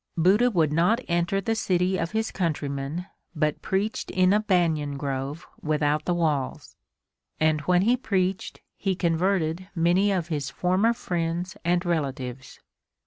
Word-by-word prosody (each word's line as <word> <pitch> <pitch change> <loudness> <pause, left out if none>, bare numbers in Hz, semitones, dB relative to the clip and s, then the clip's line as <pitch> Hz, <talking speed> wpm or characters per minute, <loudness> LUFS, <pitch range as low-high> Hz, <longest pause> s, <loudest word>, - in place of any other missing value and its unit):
Buddha 200 +9 +4
would 160 -9 +1
not 180 +9 +3
enter 175 +3 +1
the 210 +4 -1
city 185 -3 +1
of 165 0 -1
his 220 +1 -1
countrymen 150 -1 -2 0.3
but 150 -1 0
preached 200 +3 -2
in 185 0 +3
a 210 - +4
banyan 165 -8 +1
grove 140 +2 -4 0.2
without 150 0 0
the 175 - +1
walls. 150 -6 -1 0.6
And 155 -1 +2
when 180 +5 +3
he 240 +4 +4
preached 190 -6 -2 0.2
he 195 -2 -1
converted 175 0 0
many 180 +4 +3
of 175 -3 -1
his 145 -4 -2
former 185 +9 +2
friends 175 -3 -3
and 175 +1 +1
relatives. 135 -6 -3
175 Hz, 140 wpm, -26 LUFS, 155-190 Hz, 0.6 s, Buddha